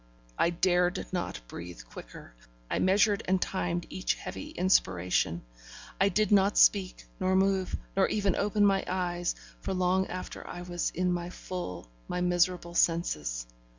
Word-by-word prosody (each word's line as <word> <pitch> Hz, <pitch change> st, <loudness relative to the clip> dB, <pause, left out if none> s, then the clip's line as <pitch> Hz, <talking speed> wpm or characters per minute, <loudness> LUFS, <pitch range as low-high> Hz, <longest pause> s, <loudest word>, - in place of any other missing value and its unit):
I 170 Hz, -, +3 dB
dared 180 Hz, +1 st, +1 dB
not 175 Hz, -, -3 dB
breathe 85 Hz, -6 st, -8 dB
quicker, -, -, -11 dB, 0.4 s
I -, -, +1 dB
measured 200 Hz, +2 st, +3 dB
and 190 Hz, 0 st, +3 dB
timed 175 Hz, -2 st, -2 dB
each 185 Hz, -, -1 dB
heavy 300 Hz, -, -7 dB
inspiration; 90 Hz, -, +1 dB, 0.6 s
I 195 Hz, -, +4 dB
did 215 Hz, +1 st, +1 dB
not 200 Hz, 0 st, +4 dB
speak, 190 Hz, -3 st, +4 dB
nor 185 Hz, 0 st, +2 dB
move, 190 Hz, -1 st, +2 dB, 0.2 s
nor 190 Hz, 0 st, +4 dB
even 200 Hz, -3 st, +1 dB
open 205 Hz, 0 st, +2 dB
my 195 Hz, -1 st, +3 dB
eyes, 175 Hz, -1 st, -1 dB, 0.2 s
for 190 Hz, -, -3 dB
long 185 Hz, +1 st, +2 dB
after 185 Hz, 0 st, -7 dB
I 175 Hz, -, -7 dB
was 175 Hz, -1 st, -2 dB
in 180 Hz, 0 st, +1 dB
my 175 Hz, 0 st, -3 dB
full, 175 Hz, -, -6 dB, 0.2 s
my 180 Hz, -, -2 dB
miserable 175 Hz, -1 st, +1 dB
senses. 75 Hz, -, +1 dB
180 Hz, 150 wpm, -29 LUFS, 175-190 Hz, 0.6 s, I